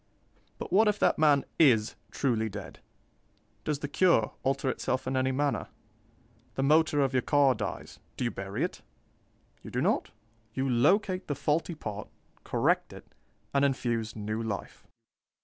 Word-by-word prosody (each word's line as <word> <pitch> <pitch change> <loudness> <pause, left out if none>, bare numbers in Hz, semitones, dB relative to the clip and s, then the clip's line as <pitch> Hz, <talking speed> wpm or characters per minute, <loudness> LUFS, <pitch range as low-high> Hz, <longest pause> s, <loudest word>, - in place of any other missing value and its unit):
But - - -6
what 215 +3 +5
if 210 0 +2
that - - +2
man 145 -3 +4
is 120 -9 +5 0.2
truly 115 -5 0
dead? 100 -2 -8 0.8
Does 150 -2 -1
the 145 - -4
cure 145 -8 +3
alter 135 0 0
itself 130 0 -1
in 130 +1 -2
any 130 0 +1
manner? 140 +1 0 0.9
The 135 - 0
motor 150 +1 +4
of 135 -1 +1
your 130 - +3
car 140 0 +4
dies 105 -3 -6 0.2
do - - -2
you 120 - 0
bury 95 0 -4
it? - - -3 0.8
You - - -9
do - - -2
not; - - +1 0.5
you 135 0 0
locate 185 - +2
the 145 - -1
faulty 160 +4 0
part, 105 -7 -6 0.4
correct - - +1
it, - - -14 0.4
and 140 0 +3
infuse 120 -5 0
new 110 +1 -3
life. 110 -3 -5
135 Hz, 155 wpm, -29 LUFS, 115-150 Hz, 0.9 s, what